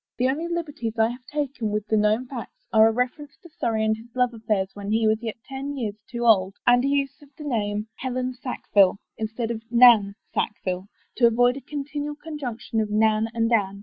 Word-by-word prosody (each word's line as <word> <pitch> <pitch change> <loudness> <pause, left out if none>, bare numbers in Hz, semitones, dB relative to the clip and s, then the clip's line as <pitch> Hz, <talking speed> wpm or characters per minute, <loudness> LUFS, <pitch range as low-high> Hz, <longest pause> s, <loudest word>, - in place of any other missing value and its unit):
The 250 - +2
only 300 +6 -1
liberties 300 -9 -4
I 220 0 +4
have 245 +1 -9
taken 280 -7 -2
with 210 0 -2
the 220 - 0
known 215 +3 +2
facts 250 -2 -9
are 220 0 +7
a - - +3
reference 255 +5 -3
to 345 - -13
Surrey 220 -1 +1
and 220 0 +2
his 230 +2 -15
love 250 -1 +2
affairs 215 -4 -1
when 200 0 -7
he 220 +1 +2
was 220 +1 +2
yet 225 -2 -4
ten 275 +1 -5
years 210 -4 -4
too 240 -2 -4
young 195 -5 +4
and 245 0 +5
a - - +1
use 280 -1 -1
of 290 - -17
the 300 - -8
name 210 -6 -1
Helen 255 0 -2
vu 255 - -14
FOREWORD 250 - -4 0.2
Sackvillc 195 -1 +6 0.2
instead 225 +1 -2
of 225 -1 -4
Nan 235 -4 +6 0.2
SackviUc 185 -2 -2 0.3
to 240 - +6
avoid 245 +2 +3
a 275 - -7
continual 290 +1 -4
conjunction 275 -8 -4
of 215 - -2
Nan 215 +1 +2
and 230 0 +1
Anne. 200 -3 +1
235 Hz, 215 wpm, -24 LUFS, 215-265 Hz, 0.3 s, are